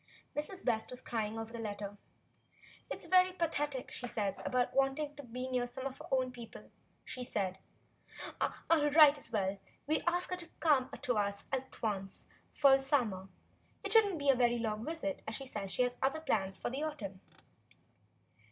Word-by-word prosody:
Mrs. 335 +6 -3
West 220 -3 +1
was 250 - -5
crying 225 -3 -2
over 225 +1 -5
the 235 - -5
letter. 205 -2 -4 0.9
"It - - -3
is - - -7
very 370 0 +5
pathetic 295 -6 -1
what - - -11
she 245 - -3
says 205 -4 0
about 250 -1 +1
wanting 275 +2 +1
to 285 - -7
be 250 0 -5
near 250 -1 0
some 260 +2 -7
of 270 -1 -4
her - - -9
own 260 -1 +2
people," 235 -2 -10 0.3
she 250 - -4
said. 195 -6 -2 1.1
"I'll 305 -3 +4
write 295 -1 +8
as 245 - -6
well 210 -4 +2
as 190 - +1
you, 200 - -9
and - - -28 0.5
we'll - - +5
ask 355 +1 -1
her 365 - 0
to 345 -2 -6
come 280 -5 +4
to 245 -3 +1
us 200 0 -1
at 265 -1 -3
once 195 -3 -2 0.3
for 280 -2 +6
the - - -5
summer. 230 -9 0 0.5
It 400 - -2
would 445 -2 +8
n't - - -2
be 285 - -4
such - - +9
a - - -2
very 240 -1 +4
long 220 -2 -2
visit, 315 -1 -3
for 220 - -5
she 270 +5 -4
says 205 -6 -3
she 250 - +3
has 245 0 0
other 275 +4 +1
plans 195 -10 0
for - - -3
the 270 +3 -3
autumn." 210 -12 -4
255 Hz, 205 wpm, -34 LUFS, 220-295 Hz, 1.1 s, such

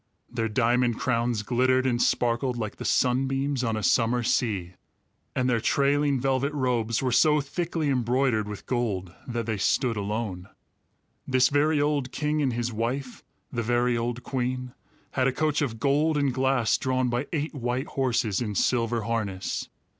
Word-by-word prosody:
Their 115 -2 -1
diamond 120 +1 +2
crowns 115 -3 0
glittered 130 +3 +2
and 120 -2 +1
sparkled 120 +1 +1
like 110 -3 -4
the - - -7
sunbeams 135 +1 +1
on 115 -2 0
a 110 - -3
summer 120 +5 +2
sea; 100 -7 0 0.6
and 125 - +1
their 120 -2 +2
trailing 140 +1 +2
velvet 135 +2 0
robes 125 -4 0
were 130 - +1
so 150 +5 +4
thickly 165 +2 -2
embroidered 125 -3 +1
with 105 -1 -7
gold 100 -8 -2
that 120 -2 -3
they 110 -2 -2
stood 115 +4 +1
alone. 100 -2 -3 0.8
This 130 -1 +4
very 150 +1 +2
old 145 -3 0
king 150 0 -1
and 135 -3 +1
his 120 0 -2
wife, 125 +4 -3 0.3
the 120 - -2
very 120 +1 +1
old 120 +1 -2
queen, 125 -1 -3 0.4
had 130 -1 +1
a - - +2
coach 155 +2 0
of 115 -6 -2
gold 150 +5 +2
and 140 -3 +1
glass 130 -3 +2
drawn 130 -1 0
by 120 +4 -1
eight 155 -2 -2
white 125 0 -2
horses 120 -6 0
in 105 -4 -3
silver 115 +2 +1
harness. 105 -4 -3
125 Hz, 160 wpm, -26 LUFS, 115-135 Hz, 0.8 s, so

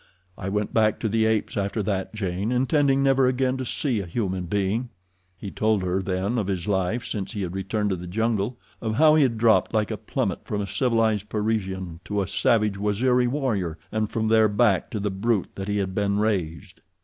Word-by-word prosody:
I 95 0 -5
went 105 +1 -2
back 110 -1 +2
to 115 - 0
the 110 +1 +2
apes 110 -1 0
after 100 +1 -1
that, 95 -1 -2
Jane, 100 +1 -2
intending 135 +2 +2
never 135 -1 +4
again 130 0 +1
to 130 - -4
see 125 -1 -1
a 95 - -5
human 95 -2 -2
being." 105 +6 -1 0.5
He 100 - -7
told 110 -3 +1
her 90 +1 0
then 95 +5 -1
of 100 - -2
his 95 -2 -2
life 100 +4 0
since 100 +1 -4
he 105 -3 -3
had 90 -1 -4
returned 100 +2 -1
to - - +1
the 90 0 -8
jungle—of 110 +2 -2
how 155 +3 +6
he 155 - +5
had 125 -5 +2
dropped 110 0 +3
like 105 -1 +1
a - - -2
plummet - - -2
from 105 - -3
a 100 - -1
civilized 110 -1 +1
Parisian 95 -6 -2
to 105 -1 -2
a - - -6
savage 100 +1 +1
Waziri 125 +5 +2
warrior, 115 - -1
and 110 -1 -1
from 110 -1 -1
there 110 -1 +4
back 105 -3 +2
to 110 - -4
the 100 0 -1
brute 100 0 0
that 95 0 -6
he 105 0 0
had 95 -2 -1
been 100 0 0
raised. 90 -8 -2
105 Hz, 210 wpm, -25 LUFS, 95-115 Hz, 0.5 s, how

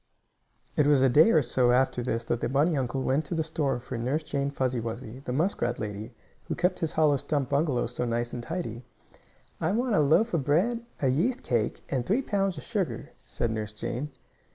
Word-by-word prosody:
It 150 - +3
was 145 -3 +5
a 135 - +5
day 150 - +6
or 155 -9 +4
so 125 0 +2
after 125 0 +2
this 115 -1 -1
that 120 0 -2
the - - 0
bunny 150 +5 +2
uncle 130 0 -1
went 135 +4 +1
to 170 - -3
the 160 - +1
store 155 -5 -1
for 120 -1 -6
Nurse 135 +7 -1
Jane 140 -2 -1
Fuzzy 130 -3 -1
Wuzzy, 115 +1 -6
the - - -3
muskrat 130 -5 0
lady, 105 0 -5 0.4
who - - -2
kept 180 +1 +1
his 165 - -2
hollow 150 -3 +4
stump 140 -1 -1
bungalow 140 -3 +1
so 125 +1 -3
nice 120 0 -1
and 120 - -4
tidy. 125 -5 -5 0.8
"I 160 +4 0
want 240 +1 +1
a - - +4
loaf 160 +11 +3
of 155 - +1
bread, 205 - +1 0.2
a - - +4
yeast 210 - +1
cake 115 -3 0
and 130 -3 0
three 220 - +1
pounds 195 -6 0
of - - -7
sugar," 205 -6 -3
said 115 - -2
Nurse 105 -1 -4
Jane. 125 +6 -4
140 Hz, 210 wpm, -28 LUFS, 120-160 Hz, 0.8 s, day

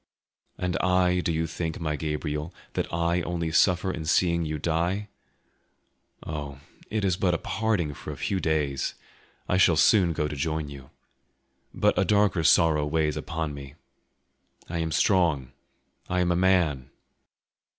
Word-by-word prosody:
"And 90 0 -1
I, 90 -1 +2
do 85 - 0
you 80 0 0
think, 80 0 -4
my 75 -2 -2
Gabriel, 75 +1 -3 0.2
that - - -2
I 85 +1 +1
only 85 -2 -2
suffer 90 +2 +3
in 85 -3 -5
seeing 85 +1 +2
you 75 0 -3
die? 85 +6 -1 1.2
Oh, 75 -3 -6 0.3
it 105 -2 -1
is 95 -2 +2
but 90 -3 +1
a - - 0
parting 105 -10 -1
for - - -8
a - - -8
few 95 - -1
days; 75 -5 -1 0.5
I 90 - +1
shall 90 -3 +5
soon 90 +1 +4
go 75 -1 -1
to 75 - -5
join 80 +1 -2
you. 70 -2 -11 0.8
But - - +1
a - - +4
darker 100 -5 +2
sorrow 80 -2 +4
weighs 75 -1 0
upon 80 -2 -4
me. 70 0 -9 0.9
I 85 0 -3
am 80 -1 -2
strong, 80 -10 +2 0.6
I 90 0 +1
am 90 0 +1
a - - +2
man". 85 -8 +2
80 Hz, 155 wpm, -26 LUFS, 75-90 Hz, 1.2 s, shall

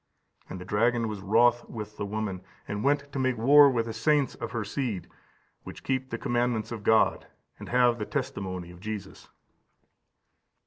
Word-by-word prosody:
And 95 - -6
the 90 - -8
dragon 115 +4 +1
was 105 -2 -5
wroth 120 +4 +3
with 105 -2 -7
the 100 - -3
woman, 105 -3 -3 0.3
and 105 0 -3
went 140 0 +1
to 140 - -4
make 130 -2 +1
war 140 +5 +7
with 120 -3 0
the 115 - -5
saints 140 +5 +2
of - - -6
her 115 -2 -3
seed, 105 -4 -3 0.5
which - - -10
keep 130 0 -1
the 115 - -3
commandments 120 -2 -1
of 115 -3 -5
God, 110 +2 +3 0.3
and - - -9
have 120 -1 +3
the 105 - -2
testimony 90 -3 -4
of 90 - -14
Jesus." 105 0 -7
115 Hz, 175 wpm, -28 LUFS, 105-125 Hz, 0.5 s, war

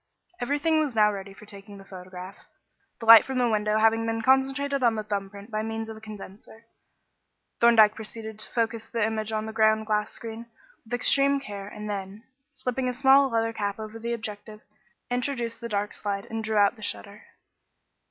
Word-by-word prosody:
Everything 290 +5 +1
was 290 -6 -1
now 210 -1 +5
ready 195 0 -7
for 195 +2 -14
taking 200 0 -11
the 195 - -13
photograph. 185 0 -10 0.6
The 230 - -7
light 225 -1 +10
from 265 -1 -4
the 245 -1 +3
window 210 -1 +1
having 225 +1 +3
been 225 0 -2
concentrated 270 +2 +2
on 235 -2 +3
the 215 - -3
thumb 200 -2 -3
print 200 +3 -12
by 215 0 -1
means 225 0 -4
of 220 - -7
a - - -13
condenser, 215 +1 -11 0.9
Thorndyke 225 -3 +6
proceeded 220 0 -8
to - - -1
focus 230 -1 -2
the 230 -2 0
image 220 0 -2
on 215 0 -2
the 220 - -6
ground 220 0 +3
glass 210 -1 0
screen 230 0 -8 0.4
with 240 +2 -2
extreme 275 +3 +3
care 200 -6 -8
and 210 0 -8
then, 200 +1 -5 0.3
slipping 255 -2 -2
a - - -2
small 270 +2 +5
leather 225 -1 0
cap 205 -2 -3
over 220 +1 -8
the 235 +1 -3
objective, 215 -1 -6 0.5
introduced 245 -2 -2
the 235 - -5
dark 205 -1 -2
slide 200 0 -4
and 225 0 -3
drew 215 0 -1
out 205 +3 +4
the - - -14
shutter. 205 0 -6
220 Hz, 190 wpm, -26 LUFS, 210-235 Hz, 0.9 s, light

